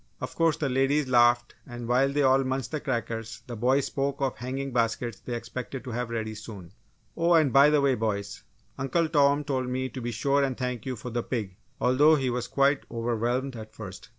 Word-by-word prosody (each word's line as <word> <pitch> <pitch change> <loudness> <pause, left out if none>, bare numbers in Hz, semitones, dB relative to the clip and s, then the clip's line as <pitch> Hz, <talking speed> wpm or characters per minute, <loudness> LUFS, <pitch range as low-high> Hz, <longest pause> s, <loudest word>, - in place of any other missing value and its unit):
Of - - -5
course 165 -2 +2
the 145 - -1
ladies 135 +2 +1
laughed 120 -1 +4
and 120 -2 -7
while 130 +3 +3
they 145 +1 +1
all 135 0 +4
munched 130 -1 -2
the 155 - -2
crackers 115 -5 -4
the 120 - -7
boys 130 +5 +2
spoke 140 0 -2
of 135 -2 0
the - - -21
hanging 130 +2 -4
baskets 115 -2 -1
they 120 - -5
expected 120 +3 -6
to 130 - -6
have 120 +1 -3
ready 110 -2 -3
soon. 105 -5 -10 0.4
"Oh, 170 0 +3
and 155 -6 +3
by 140 +2 +7
the 150 -1 +3
way, 140 -1 +3
boys, 100 -3 -3 0.4
Uncle 135 +5 +1
Tom 145 -1 +3
told 130 -3 -2
me 130 +1 -2
to 130 - -7
be 120 - -3
sure 140 +5 +1
and 135 -2 -1
thank 125 -2 -3
you 130 - -2
for 120 +2 -7
the 120 +1 -1
pig 110 -7 -4 0.2
although 145 +5 +5
he 135 -4 0
was 125 0 -2
quite 140 0 +2
overwhelmed 120 +3 -1
at 110 -1 -10
first. - - -9
130 Hz, 215 wpm, -27 LUFS, 115-140 Hz, 0.4 s, by